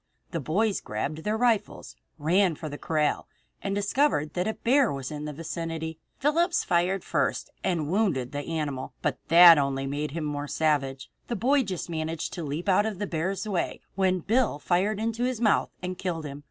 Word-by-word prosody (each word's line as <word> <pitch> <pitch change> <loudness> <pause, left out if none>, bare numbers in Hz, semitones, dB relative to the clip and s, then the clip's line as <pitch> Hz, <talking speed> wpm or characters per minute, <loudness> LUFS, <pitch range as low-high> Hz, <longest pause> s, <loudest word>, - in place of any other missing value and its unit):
The 170 - -2
boys 195 - 0
grabbed 140 +9 -3
their 215 +1 +1
rifles, 235 -3 0 0.2
ran 170 +3 +2
to 155 - -6
the 145 - -7
corral, 155 -2 0 0.3
and 195 0 -2
discovered 205 - +1
that 180 +2 -1
a 220 - -1
bear 260 +1 +3
was 135 0 -5
in 150 0 -5
the 150 - -4
vicinity. 160 +1 -5 0.2
Phillips 335 +5 +2
fired 180 +2 +1
first - - -1
and 165 -5 0
wounded 170 - 0
the 145 - -3
animal. 145 -4 -3
But - - 0
that 170 -1 +9
only 135 -1 -1
made 145 +2 -2
him 155 +1 -4
the 150 - -2
more 145 0 -4
savage. 140 -4 0 0.2
The 240 - -2
boy 270 +7 +3
just 190 -8 -4
managed 160 -1 -3
to 170 - -4
leap 150 +5 -4
out 200 +2 +4
of 215 -3 -4
the 205 - -2
bear's 185 +4 -2
way 190 -5 -1
when 185 -2 +1
Bill 225 - +1
fired 190 +7 +1
into 230 +2 -1
his 250 -2 -1
mouth 220 -3 +3
and 180 0 -4
killed 170 -4 -3
him. 140 -1 -6
170 Hz, 195 wpm, -27 LUFS, 150-205 Hz, 0.3 s, that